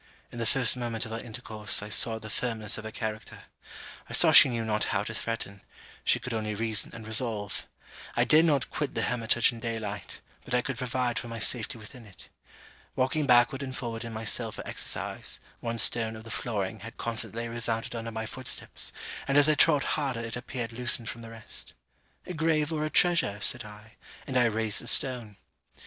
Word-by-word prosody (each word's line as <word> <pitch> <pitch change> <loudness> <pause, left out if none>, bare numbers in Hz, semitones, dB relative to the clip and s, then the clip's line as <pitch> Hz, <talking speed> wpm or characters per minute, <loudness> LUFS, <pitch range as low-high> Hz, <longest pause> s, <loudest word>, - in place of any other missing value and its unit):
In 120 - -8
the 115 - -1
first 130 -4 +5
moment 120 -2 -2
of 110 - -9
our 115 - -3
intercourse, 110 -3 +3
I 105 - -7
saw 110 +2 +3
the 110 -1 -9
firmness 110 -2 -1
of 110 - -9
her - - -4
character. 110 -1 -6 0.7
I - - -8
saw - - +5
she - - +10
knew 115 -2 -2
not 105 -1 0
how 95 - 0
to 110 - -6
threaten; 110 -3 -4 0.4
she - - +3
could 125 0 -6
only 110 -1 -3
reason 110 0 +1
and 115 -1 -9
resolve. 110 -2 -2 0.5
I - - +3
dared 155 +2 +5
not 145 -6 +1
quit 150 -2 -3
the - - 0
hermitage 120 0 +2
in 120 - -10
day 115 0 -3
light, 105 -2 -6 0.2
but 125 - -3
I 125 - +1
could 135 -3 -5
provide 125 -1 -1
for - - -7
my 115 0 -6
safety 115 +1 0
within 115 +2 -12
it. 95 - -16 0.7
Walking 140 +3 0
backward 120 +1 +4
and 130 -2 -5
forward 115 -2 -5
in 115 - -7
my 110 0 -6
cell 115 +1 0
for - - -9
exercise, - - -1 0.2
one 115 0 -4
stone 115 0 +6
of 110 - -10
the 115 - -10
flooring 110 -3 -3
had 115 +3 -10
constantly 115 0 -3
resounded 115 -1 -2
under 115 -1 -5
my 110 0 -5
footsteps, 130 +3 -3 0.4
and 140 - +2
as 145 0 +6
I 155 - +5
trod 150 -2 +4
harder 135 -6 -2
it 115 -1 -5
appeared 120 -1 -6
loosened 120 -1 -1
from 115 - -7
the 115 - -10
rest. 115 -1 -2 0.5
'A 180 - -6
grave 160 -1 0
or 155 -1 -2
a - - -2
treasure?' 170 - +3
said 120 +3 0
I, 105 +1 -14 0.3
and 130 - -6
I 125 -1 +4
raised 110 -2 +1
the - - -5
stone. 120 -6 +2
115 Hz, 205 wpm, -28 LUFS, 110-125 Hz, 0.7 s, she